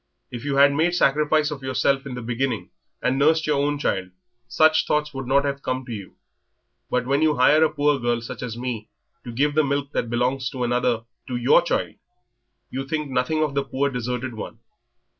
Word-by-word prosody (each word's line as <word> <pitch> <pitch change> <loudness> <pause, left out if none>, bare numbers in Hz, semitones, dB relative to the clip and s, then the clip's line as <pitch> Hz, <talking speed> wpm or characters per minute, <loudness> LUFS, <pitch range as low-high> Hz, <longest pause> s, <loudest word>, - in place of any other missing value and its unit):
If 120 -1 -6
you 140 -1 -1
had 140 0 +6
made 165 +4 +1
sacrifice 150 0 +2
of 140 -2 -6
yourself 135 +1 0
in 130 - -6
the 125 - -6
beginning 115 -4 -2 0.3
and 130 +2 +1
nursed 160 +2 +3
your 145 -2 +1
own 145 0 0
child 95 -10 -1 0.4
such 155 +5 +3
thoughts 150 0 0
would 135 -2 -5
not 140 +2 +3
have 140 0 -2
come 130 0 -3
to 125 - -8
you. 100 -4 -7 0.7
But 125 -1 0
when 140 +3 +1
you 155 -1 +3
hire 145 +5 +5
a 160 - +4
poor 145 -1 +1
girl 120 -1 0
such 115 - -8
as 120 -2 -5
me 120 -3 -4 0.3
to 120 - -7
give 145 +5 +1
the 155 +1 +3
milk 140 0 -1
that 120 - -2
belongs 125 +2 0
to 130 -2 -4
another 120 -1 +1 0.2
to 125 - -3
your 120 0 +5
child, - - -2 0.7
you 135 +1 -3
think 150 -1 -3
nothing 130 +5 +1
of 150 -2 -1
the 140 0 0
poor 140 +1 -1
deserted 125 0 -3
one. 110 - -7
135 Hz, 205 wpm, -23 LUFS, 125-145 Hz, 0.7 s, had